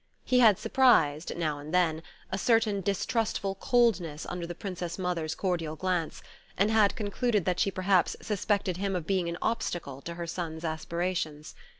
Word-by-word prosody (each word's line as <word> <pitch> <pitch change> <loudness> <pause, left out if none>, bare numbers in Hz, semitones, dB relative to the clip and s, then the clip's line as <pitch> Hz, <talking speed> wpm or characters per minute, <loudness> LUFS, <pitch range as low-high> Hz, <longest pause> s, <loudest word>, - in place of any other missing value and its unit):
He 250 - +3
had 220 -6 +6
surprised, 165 - +3
now 155 -4 -1
and 150 +2 -8
then, 165 -3 +2 0.3
a 190 - -1
certain 225 -2 +2
distrustful 200 +1 -1
coldness 195 - +1
under 175 -1 -5
the 175 - -6
Princess 180 -2 -5
Mother's 175 -4 -2
cordial 170 -5 -2
glance, 180 -1 -2 0.3
and 200 +3 +3
had 215 -2 +4
concluded 215 -2 0
that 180 -1 0
she - - +3
perhaps 185 -1 +2
suspected 205 -3 -1
him 195 0 -1
of 175 -4 -3
being 185 -1 0
an 170 - -4
obstacle 170 - -2
to 170 +3 -6
her 170 0 -4
son's 165 -1 -5
aspirations. 160 -1 -3
180 Hz, 165 wpm, -29 LUFS, 165-200 Hz, 0.3 s, had